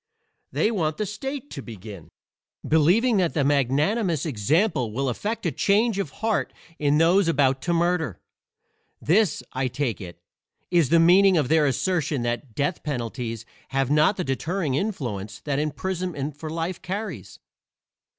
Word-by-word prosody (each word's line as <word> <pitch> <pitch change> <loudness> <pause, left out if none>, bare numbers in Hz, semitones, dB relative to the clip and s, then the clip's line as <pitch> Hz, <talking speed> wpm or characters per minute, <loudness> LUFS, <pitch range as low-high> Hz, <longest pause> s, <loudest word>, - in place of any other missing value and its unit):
They 220 - +1
want 155 -8 -1
the 215 - -1
state 270 +7 -6
to 140 - -6
begin, 105 -7 -10 0.6
believing 185 +10 +4
that 180 -3 +1
the 150 - +2
magnanimous 145 - +1
example 140 - +1
will 135 +4 -1
effect 205 - -3
a 170 - +1
change 210 +3 +2
of 190 -7 -2 0.2
heart 220 -2 0 0.3
in 145 0 +2
those 175 +4 +4
about 135 -4 +2
to 175 - 0
murder. 165 - 0 0.8
This, 190 +3 +2
I 130 0 0
take 125 -3 -2
it, 85 -2 -9 0.5
is 170 -7 +3
the 170 - +5
meaning 185 +3 +6
of 145 -5 +1
their 155 -2 +4
assertion 150 -1 0
that 120 0 -3
death 145 +4 -1
penalties 120 -4 -4 0.2
have 135 0 -1
not 155 +7 +4
the 180 - -1
deterring 160 +2 -2
influence 125 - -3
that 140 -2 -1
imprisonment 155 -2 -3
for 155 +1 -7
life 165 +3 -3
carries. 205 +4 -5
155 Hz, 150 wpm, -24 LUFS, 135-185 Hz, 0.8 s, meaning